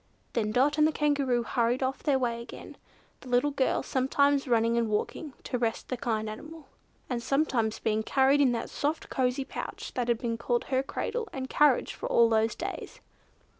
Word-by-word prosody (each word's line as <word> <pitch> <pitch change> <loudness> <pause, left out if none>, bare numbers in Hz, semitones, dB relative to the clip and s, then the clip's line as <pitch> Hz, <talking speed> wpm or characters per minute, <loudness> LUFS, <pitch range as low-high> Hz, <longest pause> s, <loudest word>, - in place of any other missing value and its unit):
Then 215 -3 0
Dot 285 +6 +2
and 305 - +6
the - - +1
Kangaroo 280 -5 +1
hurried 240 +2 0
on 260 +1 +1
their 285 -3 +3
way 235 -2 -1
again, 235 - -10 0.4
the 255 - -12
little 250 +4 +2
girl 275 -2 +1
sometimes 280 +2 +2
running 230 -1 +2
and 235 -2 +1
walking 260 +7 -2
to 250 - -3
rest 230 -1 -2
the 255 - -1
kind 220 -3 -2
animal, 305 +9 -8 0.4
and 245 -2 -2
sometimes 240 -5 +1
being 220 -1 0
carried 270 +5 +3
in 265 -3 +4
that 235 - -4
soft 300 +2 -2
cosy 260 0 0
pouch - - -6
that 245 -2 -1
had 235 -1 +2
been 230 -1 -3 0.3
her 260 -1 +2
cradle 445 - -3
and 260 -1 -5
carriage 295 -4 +3
for - - -5
all 235 -1 +5
those 225 0 +2
days. - - -6
255 Hz, 185 wpm, -28 LUFS, 235-280 Hz, 0.4 s, and